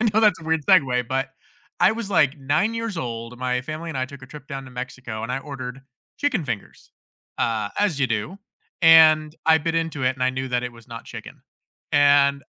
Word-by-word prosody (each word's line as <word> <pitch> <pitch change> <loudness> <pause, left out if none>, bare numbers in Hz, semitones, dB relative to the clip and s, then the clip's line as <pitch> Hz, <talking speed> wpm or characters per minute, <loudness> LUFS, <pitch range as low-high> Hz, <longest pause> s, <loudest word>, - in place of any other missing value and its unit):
I 225 - +3
know 220 - +4
that's 205 -6 +3
a - - -12
weird 160 -2 0
segue, 130 -10 +3
but, 135 +1 -1 0.5
I - - +6
was, 225 -2 -4
like, 150 -7 +2
9 155 +11 0
years 230 -4 -4
old, 115 -3 -5
my 125 0 -1
family 155 +5 -6
and 145 -5 -4
I 130 - 0
took 135 0 -12
a - - -10
trip 145 +1 -12
down 135 -2 -6
to - - -12
Mexico, 125 -3 -6
and 120 - -4
I 135 - -1
ordered 135 -2 -7 0.4
chicken 285 - 0
fingers, 115 -7 -7 0.5
uh, 110 -3 -1
as 205 -8 +1
you 140 - +2
do, 115 - -3 0.4
and 155 -2 +7
I 160 0 +6
bit 165 +2 -2
into 165 -4 -1
it, 125 - +4
and 130 - -6
I 130 - +3
knew 130 +1 -4
that 125 -1 -1
it 125 - -4
was 115 -1 -17
not 115 -1 -9
chicken, - - -10 0.5
and 140 -1 +4
140 Hz, 220 wpm, -23 LUFS, 125-160 Hz, 0.5 s, and